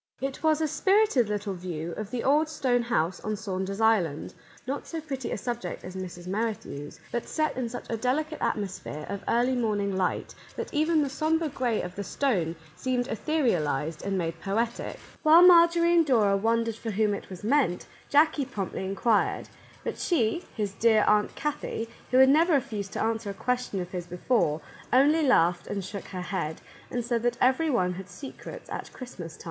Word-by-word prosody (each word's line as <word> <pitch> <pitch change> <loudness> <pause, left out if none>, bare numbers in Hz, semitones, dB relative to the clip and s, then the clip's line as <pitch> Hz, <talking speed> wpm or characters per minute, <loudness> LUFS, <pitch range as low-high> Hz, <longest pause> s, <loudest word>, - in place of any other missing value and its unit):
It 270 0 -4
was 315 -1 +3
a 315 - +2
spirited 380 - +3
little 205 -1 -2
view 170 -2 -5
of 210 +4 -5
the 240 +1 -3
old 300 +3 +3
stone 255 -6 +1
house 185 -7 0
on 215 0 -3
Saunder's 195 0 -4
Island; 200 -10 +2 0.3
not 275 +3 -4
so 330 - -4
pretty 270 -5 -5
a - - -1
subject 240 +3 -4
as 185 +1 -8
Mrs. 180 -2 -7
Merrithew's, 195 -7 -4
but 240 - -3
set 310 -1 0
in 250 -2 -2
such 245 - -7
a 230 - -2
delicate 300 +7 -1
atmosphere 185 -7 -3
of 200 0 -4
early 245 +2 +2
morning 205 -5 0
light 185 -1 -1 0.2
that - - -5
even 310 +1 +3
the 280 - -2
sombre 315 +2 +1
gray 245 -5 -1
of 180 0 -6
the 200 - -5
stone 185 - 0 0.2
seemed 255 0 -1
etherialized 170 - 0
and 195 -1 -1
made 165 -2 -3
poetic. 225 +4 -2 0.2
While 325 +3 +7
Marjorie 340 -1 +6
and 340 -1 +6
Dora 220 -9 +3
wondered 230 +2 +1
for 230 - -5
whom 210 0 +1
it 200 - -6
was 185 0 -9
meant, 245 -6 +2 0.2
Jackie 295 -1 +4
promptly 205 -8 -4
inquired, 200 +3 +1 0.2
— - - -24
but - - -4
she, 330 0 +1
his 205 -2 -2
dear 220 0 +4
Aunt 210 0 +3
Kathie, 290 -6 -3 0.2
who 255 - +3
had 265 0 +8
never 325 +4 +5
refused 215 -8 -1
to - - -1
answer 220 -2 -1
question 250 -2 -1
of 180 0 -5
his 175 -2 -5
before, 175 -4 0 0.3
only 290 +6 +5
laughed 175 - +3
and 200 -2 -3
shook 200 +1 -6
her 185 -2 -6
head, 170 -4 -3 0.3
and 240 -1 -2
said 235 -1 0
that 240 0 0
every 265 +6 +3
one 180 -9 +1
had 190 +2 -8
secrets 275 - -9
at - - -6
Christmas 185 -11 -8
time. - - -25
225 Hz, 185 wpm, -27 LUFS, 190-275 Hz, 0.3 s, had